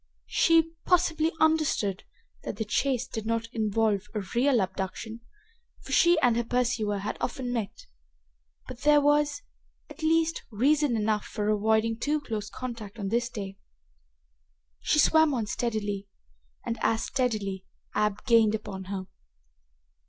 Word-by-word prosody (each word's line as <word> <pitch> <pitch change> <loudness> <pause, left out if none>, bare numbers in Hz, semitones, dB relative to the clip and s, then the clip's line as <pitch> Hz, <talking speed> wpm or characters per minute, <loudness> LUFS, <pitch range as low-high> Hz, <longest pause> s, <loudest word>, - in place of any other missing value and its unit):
She, 330 -1 +4
possibly, 325 -3 +2
understood 310 -12 +1 0.4
that - - -5
the 220 - -3
chase 255 +3 0
did 220 -3 -6
not 230 0 -1
involve 215 -2 0
a 210 - 0
real 250 +1 +3
abduction, 195 +4 -4 0.6
for - - -9
she 345 -1 +5
and 245 -2 +4
her 235 - +1
pursuer 230 -4 0
had 200 +2 -4
often 245 0 -3
met, 225 -5 -4 0.8
but 240 - -9
there 295 +1 +5
was, 290 0 +2 0.5
at - - -11
least, 325 +1 +2
reason 270 +3 +2
enough 210 -1 0
for 210 -1 -3
avoiding 220 +2 +1
too 300 +4 0
close 215 -7 -5
contact 230 -5 -7
on 200 -3 -3
this 235 +2 0
day. 195 -4 -7 1.2
She - - +1
swam 315 -1 +5
on 230 -3 -1
steadily, 205 -3 -2 0.6
and, 230 - -3
as 225 0 +1
steadily, 205 -7 -2 0.3
Ab 210 -1 0
gained 225 -3 +4
upon 195 -3 -6
her. 190 0 -5
230 Hz, 135 wpm, -27 LUFS, 210-280 Hz, 1.2 s, she